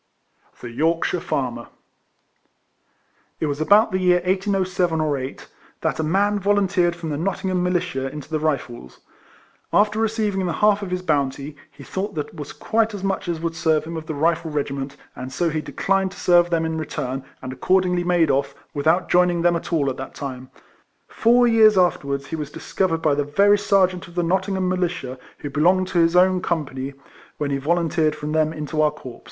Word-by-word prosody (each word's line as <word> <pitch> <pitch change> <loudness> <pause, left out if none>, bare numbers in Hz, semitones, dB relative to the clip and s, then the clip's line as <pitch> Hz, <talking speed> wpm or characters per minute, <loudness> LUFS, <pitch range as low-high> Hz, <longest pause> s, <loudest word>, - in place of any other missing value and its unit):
THE 120 - -7
YORKSHIRE 165 +6 0
FARMER. 125 -8 -3 1.7
It - - 0
was 145 0 -2
about 205 +7 +5
the 185 - 0
year 180 -1 +4
1807 185 -2 0
or 155 -2 +1
8, 130 0 -6 0.3
that - - -1
a - - +1
man 200 +6 +1
volunteered 195 -3 +2
from 165 -2 -5
the 145 - -2
Nottingham 185 +1 -1
Militia 180 -6 -1
into 150 0 -8
the 155 -1 -2
Rifles. 125 - -3 0.7
After 210 +1 +3
receiving 215 -4 0
the 170 - -1
half 210 +1 +3
of 200 - -5
his 180 0 -3
bounty, 145 -2 -1
he 140 0 -14
thought 195 +6 -4
that 150 -2 -4
was 145 -1 -7
quite 225 -1 0
as 195 - -7
much 195 -1 -2
as 170 -2 -2
would 165 0 -2
serve 160 -2 +1
him 165 +2 -7
of 160 -1 -6
the 155 - -4
Rifle 165 +2 +1
regiment, 140 -2 -3 0.2
and 130 +1 -7
so 170 +3 0
he 155 0 -2
declined 195 +3 -1
to - - -12
serve 175 -1 +4
them 165 -1 +1
in 160 0 -2
return, 135 -4 -4 0.2
and 130 0 -5
accordingly 180 +5 +1
made 175 -2 +3
off, 140 +1 -1 0.2
without 160 +5 +1
joining 175 -1 +3
them 175 0 +4
at 170 - -5
all 155 -5 +1
at 130 - -2
that 135 - -8
time. 130 -2 -6 0.6
Four 245 +2 +3
years 220 -3 +5
afterwards 140 -6 +1
he 160 - -5
was 150 -3 -5
discovered 165 +1 -2
by 155 - +3
the 145 +1 +1
very 200 +8 +3
sergeant 185 -3 +2
of 175 - -15
the 175 - +1
Nottingham 190 +2 0
Militia 175 -8 -2 0.2
who 145 - -7
belonged 180 +6 +2
to 175 - +1
his 165 +1 +3
own 185 0 +4
company 140 -6 -3 0.4
when 145 -1 -2
he 140 - +1
volunteered 160 +1 +1
from 150 0 -5
them 155 0 +2
into 155 0 -3
our 155 - +4
corps. 130 -5 -10
170 Hz, 190 wpm, -22 LUFS, 145-185 Hz, 1.7 s, about